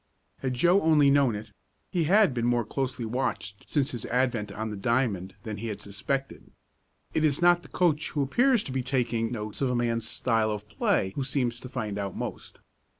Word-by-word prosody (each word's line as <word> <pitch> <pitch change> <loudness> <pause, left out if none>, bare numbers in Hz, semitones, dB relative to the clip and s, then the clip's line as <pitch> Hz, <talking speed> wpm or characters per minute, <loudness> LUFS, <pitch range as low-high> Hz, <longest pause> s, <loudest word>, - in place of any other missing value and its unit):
Had 130 -2 -2
Joe 175 +9 +4
only 150 -3 +5
known 140 -5 +3
it, 105 +1 -8 0.4
he 175 -4 +1
had 195 -2 +5
been 120 -1 0
more 120 -1 +2
closely 130 +1 -3
watched 110 -4 -3
since 145 -2 +1
his 120 -4 -5
advent 120 -5 0
on 110 +2 -4
the - - -4
diamond 100 -4 0
than 110 -2 -5
he 115 - -5
had 105 -2 -4
suspected. 120 +7 -4 0.6
It 160 - +1
is 150 -2 +3
not 175 0 +5
the - - -15
coach 155 -4 +1
who 145 - 0
appears 240 - +3
to - - -7
be 130 0 -1
taking 120 -3 0
notes 110 -1 -5
of 135 - +2
a 125 - 0
man's 115 -2 -1
style 115 -2 +1
of 105 -1 -4
play 100 -2 +1
who 140 - -1
seems 125 -3 -1
to 125 - -8
find 110 -5 -3
out 100 -2 -4
most. - - -6
125 Hz, 205 wpm, -27 LUFS, 110-140 Hz, 0.6 s, only